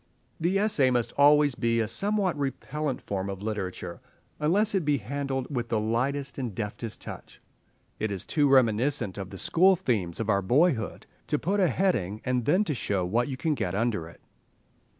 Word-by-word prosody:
The 175 +4 +1
essay 200 -11 +3
must 120 -2 +1
always 145 0 +5
be 115 -1 0
a 110 - +1
somewhat 200 - +1
repellent 145 0 -3
form 100 -1 -3
of 100 0 -6
literature, 105 -4 -4 0.4
unless 200 +8 +2
it 190 -3 +1
be 145 -1 +2
handled 135 +3 -3
with 120 -1 -2
the 110 - +1
lightest 135 +6 -1
and 120 -7 -4
deftest 105 +1 -5
touch. - - -10 0.6
It 110 - -1
is 95 -2 -4
too 145 -3 +2
reminiscent 120 -4 +2
of 95 -1 -5
the 95 - -9
school 185 - +4
themes 110 - -1
of 115 - -2
our 100 -3 +2
boyhood—to 130 - 0
put 195 +7 -1
a 185 - +4
heading 120 - 0
and 125 -2 0
then 180 +8 +3
to 160 - -2
show 100 -7 -1
what 115 +7 +1
you 135 -2 -4
can 155 +4 0
get 95 -9 -2
under 105 -6 -1
it. - - -17
125 Hz, 180 wpm, -27 LUFS, 110-150 Hz, 0.6 s, always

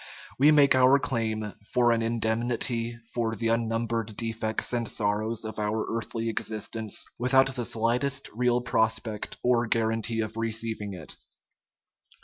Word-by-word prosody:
We 145 +3 +7
make 145 -2 +6
our 130 +1 +6
claim 110 -5 -2 0.2
for 120 -1 +4
an 115 -1 +2
indemnity 115 +1 -1 0.2
for 115 -2 -1
the 115 0 -1
unnumbered 115 -1 -1
defects 110 0 -2
and 120 -1 -1
sorrows 110 +2 -1
of 110 0 -6
our 105 +1 -1
earthly 115 0 -3
existence, 110 -1 -2
without 130 +2 +3
the 125 -2 -3
slightest 120 +6 0
real 125 +1 +1
prospect 110 -3 -1
or 120 -1 +3
guarantee 115 0 0
of 110 0 -5
receiving 110 -3 -2
it. 80 -4 -9
115 Hz, 130 wpm, -27 LUFS, 110-120 Hz, 0.2 s, We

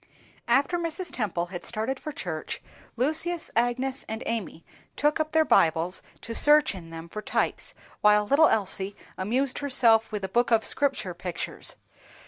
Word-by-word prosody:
After 315 +6 +2
Mrs. 335 0 -3
Temple 190 -9 -2
had 175 - -5
started 235 +4 -3
for 305 - -6
church, 160 - -4 0.4
Lucius, 315 +7 -1
Agnes 255 +3 0
and 220 +1 -4
Amy 210 -7 -4 0.3
took 295 +2 +1
up 310 0 -1
their 315 0 +4
Bibles 165 - +3 0.2
to 230 - -6
search 295 +2 +5
in 175 -4 -10
them 165 0 -8
for 215 +5 -6
types, - - -2 0.3
while 210 0 +5
little 290 +7 +5
Elsie 200 -1 0 0.2
amused 250 +8 0
herself 235 -6 +3
with 210 -2 -4
a - - -1
book 240 +5 +1
of 225 -2 +3
Scripture 270 -10 0
pictures. 175 -1 -4
230 Hz, 155 wpm, -27 LUFS, 190-285 Hz, 0.4 s, search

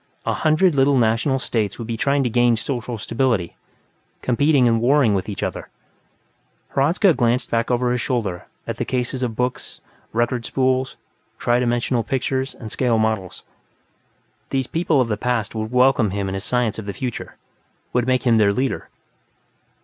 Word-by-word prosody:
A - - +1
hundred 155 +3 +3
little 135 0 +3
national 115 +4 +2
states 110 -6 -2
would 115 - -6
be 115 0 -3
trying 140 +4 +1
to - - +1
regain 120 0 +3
social 120 0 -4
stability, 110 -3 -1 0.7
competing 135 +1 +3
and 115 -1 +2
warring 130 -3 +4
with 95 -2 -1
one 105 - -4
another. - - -4 1.0
Hradzka 170 +7 +3
glanced 120 -1 0
back 115 0 0
over 125 0 +1
his 125 -1 0
shoulder 105 -10 -2 0.2
at - - -4
the - - -1
cases 125 +1 -2
of 120 -3 -2
books, 125 +1 -3 0.3
record 120 +1 0
spools, 130 +1 0 0.4
tri 120 0 +1
dimensional 120 0 0
pictures, 130 +1 -2
and 110 -3 -9
scale 120 -3 +1
models. 110 -4 -1 1.1
These 135 -1 0
people 160 -1 +1
of 125 - 0
the 105 -2 -1
past 120 -4 -1
would 110 0 -4
welcome 125 -3 +4
him 100 +1 -2
and 95 - -3
his 95 - -4
science 115 -1 0
of 105 - -8
the 100 - -3
future, 125 +1 -5 0.6
would 125 0 +1
make 130 -1 +2
him 115 -3 +4
their 100 -1 +4
leader. 130 +4 -2
120 Hz, 170 wpm, -21 LUFS, 110-130 Hz, 1.1 s, warring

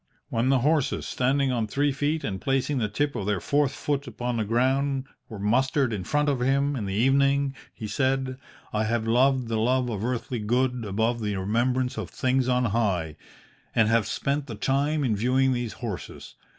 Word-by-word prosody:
"'When 115 +3 +1
the 135 -2 +3
horses, 150 -3 +1
standing 135 +1 +1
on 115 -3 0
three 145 +7 +1
feet 145 +3 -1
and 95 -2 -3
placing 135 +1 0
the 105 -3 0
tip 145 +7 -1
of 105 -4 -3
their 105 -2 +1
fourth 145 +6 +1
foot 145 -1 -2
upon 125 -1 -3
the 110 - +1
ground, 130 +4 +1 0.2
were 110 - -7
mustered 130 +5 +1
in 100 -3 -3
front 150 0 +1
of 140 -3 +1
him 140 +3 +1
in 110 -6 -3
the 95 - -2
evening, 135 +3 +3 0.2
he 110 - -8
said, 130 +4 -1 0.3
I 110 0 +1
have 115 0 0
loved 125 +2 +3
the 115 -1 -1
love 125 +2 +1
of 105 -2 -3
earthly 120 0 -2
good 125 +2 0
above 110 +4 0
the 105 -2 -1
remembrance 125 +6 0
of - - -5
things 130 0 0
on 125 0 +2
high, 90 -9 0 0.6
and 110 -1 +4
have 115 -2 +2
spent 140 +7 -1
the 115 - -6
time 140 +6 0
in 115 -5 +1
viewing 130 +5 +2
these 120 -3 -3
horses. 110 -7 -7
125 Hz, 190 wpm, -26 LUFS, 110-135 Hz, 0.6 s, and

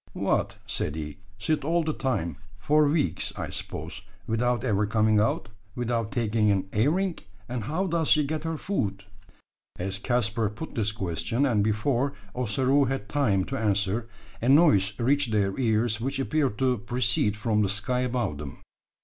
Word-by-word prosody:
"What!" - - 0
said 75 - -2
he, 75 -2 -6 0.2
"sit 145 +8 0
all 165 +3 +2
the 155 0 -1
time 100 - -2 0.2
for 150 +7 +3
weeks, 150 0 0
I - - -4
suppose 80 +5 -5 0.2
without 120 +2 0
ever 105 -4 +1
coming 110 0 +3
out 110 +1 0 0.3
without 115 -2 -1
taking 110 -2 +1
an 95 -1 +1
airing? 165 - +1 0.3
And 120 -3 -4
how 160 - -1
does 165 -3 0
she 150 - +5
get 155 +1 -3
her 165 -1 -2
food?" 100 - -2 0.7
As 95 +2 -3
Caspar 115 -1 0
put 110 +10 -8
this 105 -2 0
question, 110 +6 -1
and 110 -7 +2
before 120 +6 +1 0.2
Ossaroo 130 +4 +2
had 130 -5 -3
time 110 -10 +2
to 135 - -3
answer, 105 +1 0 0.3
a 120 - +1
noise 105 - +5
reached 140 +2 +2
their 100 -3 +1
ears 115 -2 +1
which 135 +3 -1
appeared 135 -4 0
to 125 -2 +1
proceed 105 -1 0
from 110 -1 +1
the 100 - +1
sky 105 +5 -1
above 120 - -1
them. 70 -3 -8
115 Hz, 165 wpm, -27 LUFS, 105-135 Hz, 0.7 s, she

